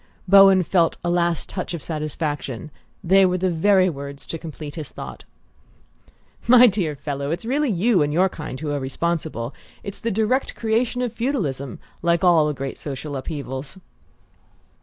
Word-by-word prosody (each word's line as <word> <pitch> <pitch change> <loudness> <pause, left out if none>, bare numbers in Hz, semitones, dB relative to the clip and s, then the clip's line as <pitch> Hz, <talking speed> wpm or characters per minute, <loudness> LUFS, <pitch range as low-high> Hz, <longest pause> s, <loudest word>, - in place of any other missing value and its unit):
Bowen 195 -1 +7
felt 170 -1 +2
a 175 - 0
last 170 -2 +1
touch 180 -2 -4
of 155 - -8
satisfaction: 150 -3 -4 0.3
they 195 +3 +5
were 180 -1 +2
the 185 0 0
very 185 +3 +4
words 140 -3 -6
to 165 - -5
complete 155 -2 -8
his 155 -3 -6
thought. - - -9 1.2
"My 250 +1 +8
dear 185 -9 +1
fellow, 140 0 -4
it's 170 +7 -3
really 280 +4 +1
you 205 0 +2
and 145 0 +1
your 180 +5 +3
kind 150 -7 -7
who 155 -2 -3
are 145 - -1
responsible. 140 -2 -2 0.3
It's 200 -1 -6
the 230 - -2
direct 220 +5 0
creation 235 +2 0
of 240 -3 -2
feudalism, 165 - -2 0.2
like 170 +1 +1
all 170 -4 +5
the 150 - -1
great 135 0 -5
social 145 +1 -5
upheavals!" 135 +2 -5
170 Hz, 160 wpm, -22 LUFS, 145-195 Hz, 1.2 s, My